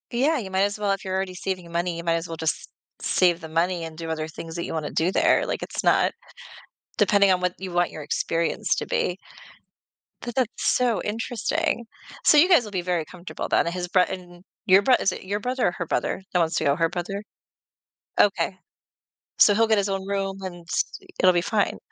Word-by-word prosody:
Yeah, 290 Hz, +6 st, +3 dB
you 200 Hz, -7 st, -5 dB
might 190 Hz, 0 st, +1 dB
as 200 Hz, +1 st, +1 dB
well 205 Hz, -1 st, 0 dB
if 195 Hz, -, -2 dB
you're 190 Hz, 0 st, -3 dB
already 190 Hz, -1 st, -2 dB
saving 185 Hz, 0 st, -4 dB
your 170 Hz, 0 st, -13 dB
money, 170 Hz, 0 st, -1 dB
you 170 Hz, -, -6 dB
might 170 Hz, -1 st, +1 dB
as 165 Hz, +1 st, -2 dB
well 165 Hz, -, -6 dB
just 160 Hz, -1 st, -2 dB, 0.3 s
save 175 Hz, -1 st, +2 dB
the 160 Hz, -, -8 dB
money 170 Hz, +2 st, 0 dB
and 160 Hz, -1 st, -8 dB
do 165 Hz, 0 st, -5 dB
other 155 Hz, -1 st, -3 dB
things 165 Hz, +1 st, -8 dB
that 170 Hz, -, -3 dB
you -, -, -5 dB
wanna 155 Hz, -2 st, -3 dB
do 170 Hz, +3 st, +1 dB
there, -, -, +3 dB
like, -, -, -3 dB
it's -, -, -4 dB
not -, -, +4 dB, 0.9 s
depending 200 Hz, -2 st, +4 dB
on 180 Hz, -1 st, +2 dB
what 180 Hz, 0 st, +1 dB
you 185 Hz, -1 st, -6 dB
want 175 Hz, 0 st, +2 dB
your 155 Hz, -, -8 dB
experience 170 Hz, +6 st, 0 dB
to -, -, -3 dB
be. 180 Hz, -, 0 dB, 1.1 s
But 240 Hz, -1 st, -6 dB
that's 255 Hz, -4 st, +2 dB, 0.3 s
so 245 Hz, -4 st, +1 dB
interesting. 225 Hz, +2 st, -1 dB, 0.4 s
So, 300 Hz, -, +6 dB
you 315 Hz, +4 st, +7 dB
guys 340 Hz, -9 st, +6 dB
will 210 Hz, -, -8 dB
be 185 Hz, -3 st, -1 dB
very 175 Hz, -2 st, -1 dB
comfortable, 180 Hz, +3 st, -7 dB
but -, -, +3 dB
and 170 Hz, -, -2 dB
his 180 Hz, -1 st, -3 dB
brot 180 Hz, 0 st, +3 dB
and 175 Hz, -1 st, -8 dB, 0.2 s
your 190 Hz, -1 st, +6 dB
brot 250 Hz, +5 st, +4 dB
Is -, -, +2 dB
it -, -, -7 dB
your 200 Hz, +2 st, -2 dB
brother 250 Hz, +3 st, 0 dB
or -, -, +1 dB
her 170 Hz, -, -2 dB
brother, 175 Hz, -, -1 dB
that 180 Hz, -, +3 dB
wants 165 Hz, -1 st, +1 dB
to -, -, 0 dB
go? 140 Hz, -, +3 dB
Her 165 Hz, +1 st, +1 dB
brother? 195 Hz, +4 st, -4 dB, 1.0 s
Okay. 195 Hz, -2 st, +2 dB, 0.8 s
So, 205 Hz, -, +7 dB
he'll 225 Hz, +2 st, +4 dB
get 220 Hz, -1 st, +3 dB
his 200 Hz, 0 st, +1 dB
own 195 Hz, 0 st, -3 dB
room, 195 Hz, -1 st, -2 dB
and, 180 Hz, -2 st, -6 dB
s -, -, +1 dB, 0.2 s
e -, -, -19 dB
it'll 185 Hz, -, +5 dB
be 175 Hz, -, +2 dB
fine. 205 Hz, +3 st, 0 dB
185 Hz, 230 wpm, -24 LUFS, 170-205 Hz, 1.1 s, you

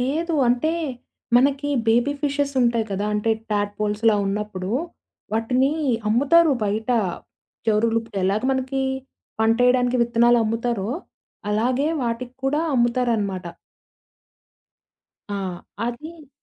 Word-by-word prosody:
లేదు. 315 Hz, +6 st, -1 dB
అంటే, 250 Hz, +7 st, +2 dB, 0.6 s
మనకి 280 Hz, +3 st, +2 dB, 0.2 s
బేబీ 240 Hz, +5 st, +3 dB
ఫిషెసుంటాయి 270 Hz, -5 st, +1 dB
కదా! 200 Hz, +2 st, -1 dB
అంటే, 210 Hz, +2 st, 0 dB, 0.2 s
టాప్‌పోల్స్‌లా 210 Hz, +1 st, +1 dB
ఉన్నప్పుడు, 195 Hz, -2 st, -3 dB, 0.6 s
వాటిని 255 Hz, +5 st, +2 dB, 0.4 s
అమ్ముతారు 290 Hz, +6 st, +4 dB
బయట. 215 Hz, +4 st, -1 dB, 0.8 s
జరులుప్పు 225 Hz, +1 st, +1 dB
ఎలాగ 200 Hz, +4 st, +1 dB
మనకి, 265 Hz, +1 st, -1 dB, 0.6 s
పంటేయడానికి 245 Hz, +2 st, +3 dB
విత్తనాలు 235 Hz, 0 st, +4 dB
అమ్ముతారో, 230 Hz, -1 st, -1 dB, 0.6 s
అలాగే 250 Hz, +7 st, +1 dB, 0.2 s
వాటికి 240 Hz, +2 st, -3 dB
కూడా, 295 Hz, +3 st, +1 dB
అమ్ముతారనమాట. 235 Hz, -6 st, +1 dB, 1.9 s
ఆ! -, -, -2 dB, 0.5 s
అది 305 Hz, +5 st, -7 dB
240 Hz, 90 wpm, -23 LUFS, 215-265 Hz, 1.9 s, అమ్ముతారు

